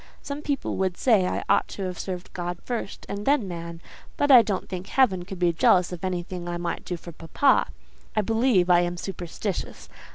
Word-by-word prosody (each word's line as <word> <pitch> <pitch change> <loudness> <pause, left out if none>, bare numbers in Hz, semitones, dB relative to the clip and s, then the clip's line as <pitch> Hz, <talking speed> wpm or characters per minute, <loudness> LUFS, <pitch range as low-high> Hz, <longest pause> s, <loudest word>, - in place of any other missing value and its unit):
Some 285 +1 -5
people 285 -3 -2
would 190 -2 0
say 210 -8 +3
I - - -2
ought - - +3
to 195 - -6
have 180 -1 -4
served 180 -2 -6
God 175 0 -4
first 235 -5 -4
and 200 +1 -4
then 275 -4 +2
man; 170 -1 -7 0.4
but 290 0 +3
I 250 -3 +10
don't 205 -4 -3
think 185 0 -6
heaven 190 -10 +2
could 190 0 -7
be 175 -1 +2
jealous 180 +2 +4
of 180 -1 -7
anything 180 -1 -3
I 175 - -2
might 175 0 -3
do 175 - -4
for 170 - -10
papa. 165 -1 +2 0.5
I 215 - +3
believe 225 -3 +2
I 175 -1 +6
am 175 0 -1
superstitious. 185 +1 -5
185 Hz, 200 wpm, -25 LUFS, 175-210 Hz, 0.5 s, I